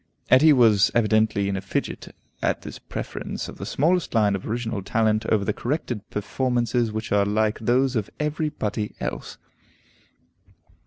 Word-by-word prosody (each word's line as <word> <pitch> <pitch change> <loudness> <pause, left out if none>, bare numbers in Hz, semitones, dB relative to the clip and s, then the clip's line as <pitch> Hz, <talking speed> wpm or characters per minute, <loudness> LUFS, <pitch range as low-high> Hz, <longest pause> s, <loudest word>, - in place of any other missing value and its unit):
Etty 150 +5 +7
was 110 -7 +5
evidently 110 -3 +2
in 100 - -1
a 95 - -3
fidget - - -4 0.3
at - - 0
this - - -8
preference - - -6
of - - -10
the - - -5
smallest 170 +3 +1
line 105 -3 +3
of 95 - -6
original 115 -2 -2
talent 110 +2 +1
over 105 -2 +2
the 105 - 0
corrected 120 -4 -3
performances 120 +2 0
which 110 +1 -5
are 100 0 +4
like 105 +1 0
those 125 +4 +2
of 110 -2 -1
every 150 +1 -1
body 105 -7 -3
else. - - -5
110 Hz, 155 wpm, -24 LUFS, 105-125 Hz, 0.3 s, Etty